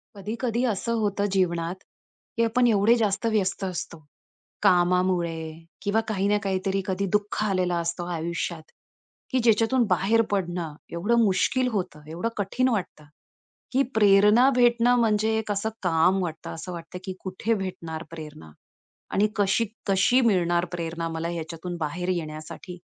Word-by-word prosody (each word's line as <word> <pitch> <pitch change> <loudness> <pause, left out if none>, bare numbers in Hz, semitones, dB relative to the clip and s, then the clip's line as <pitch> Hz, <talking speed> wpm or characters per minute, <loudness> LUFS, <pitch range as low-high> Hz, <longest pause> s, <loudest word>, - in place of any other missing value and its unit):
कधी-कधी 230 +4 -2
असं 230 0 -1
होतं 205 -1 0
जीवनात 180 -1 -1 0.5
की 230 - +3
आपण 240 +2 +3
एवढे 220 +1 +4
जास्त 210 -1 0
व्यस्त 195 -2 0
असतो, 180 -2 -4 0.7
कामामुळे 175 -3 +2 0.3
किंवा 210 +2 +1
काही 200 -3 0
ना 210 0 +3
काहीतरी 195 0 -1
कधी 190 +1 -1
दुःख 210 0 0
आलेला 185 -3 +1
असतो 170 +1 -3
आयुष्यात, 170 0 -3 0.7
की 260 - +2
ज्याच्यातून 230 +2 +3
बाहेर 195 +5 +3
पडणं 175 -5 -2 0.2
एवढं 230 +8 +2
मुश्किल 240 +6 +2
होतं, 185 -7 -3
एवढं 175 +8 -2
कठीण 225 +6 +1
वाटतं, 190 -9 -3 0.7
की 265 +2 +3
प्रेरणा 210 +4 +6
भेटणं 240 0 +4
म्हणजे 220 -1 +2
एक 220 -1 -4
असं 205 +2 -1
काम 180 +2 +3
वाटतं. 160 -2 -5
असं 170 +3 -7
वाटतं 170 +1 -8
की 190 - -4
कुठे 190 +4 -1
भेटणार 170 -5 -4
प्रेरणा? 150 - -10 0.6
आणि 205 +2 +3
कशी, 205 +3 +2 0.2
कशी 200 +6 +4
मिळणार 175 -6 +2
प्रेरणा 165 -1 -3
मला 165 0 -3
ह्याच्यातून 170 +1 -5
बाहेर 170 +3 -3
येण्यासाठी? 160 +1 -5
190 Hz, 140 wpm, -25 LUFS, 170-220 Hz, 0.7 s, प्रेरणा